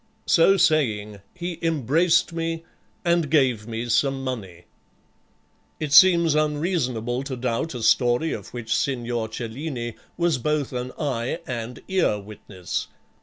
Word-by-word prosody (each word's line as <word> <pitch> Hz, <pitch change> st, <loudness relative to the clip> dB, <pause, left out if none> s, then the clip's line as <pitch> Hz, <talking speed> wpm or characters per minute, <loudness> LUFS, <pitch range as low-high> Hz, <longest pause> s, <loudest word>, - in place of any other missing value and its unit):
So 195 Hz, +4 st, +5 dB
saying 110 Hz, -, +1 dB
he 175 Hz, -1 st, -5 dB
embraced 165 Hz, +3 st, +2 dB
me, 165 Hz, 0 st, -3 dB, 0.4 s
and 170 Hz, -3 st, +2 dB
gave 130 Hz, -8 st, +2 dB
me 115 Hz, +1 st, -4 dB
some 135 Hz, +3 st, +1 dB
money." 100 Hz, -10 st, -5 dB, 1.2 s
It 150 Hz, -3 st, -3 dB
seems 170 Hz, -1 st, +7 dB
unreasonable 145 Hz, -6 st, 0 dB
to 135 Hz, -1 st, -5 dB
doubt 125 Hz, +4 st, -2 dB
a 120 Hz, -, -5 dB
story 120 Hz, +7 st, +3 dB
of -, -, -7 dB
which 115 Hz, -2 st, -2 dB
Signor 120 Hz, -4 st, -1 dB
Cellini 120 Hz, +1 st, -5 dB, 0.2 s
was 170 Hz, -6 st, +1 dB
both 150 Hz, +1 st, -1 dB
an 125 Hz, 0 st, -4 dB
eye 135 Hz, 0 st, -2 dB
and 120 Hz, -1 st, -6 dB
ear 185 Hz, -, +1 dB
witness. 100 Hz, -3 st, -6 dB
130 Hz, 125 wpm, -24 LUFS, 115-160 Hz, 1.2 s, seems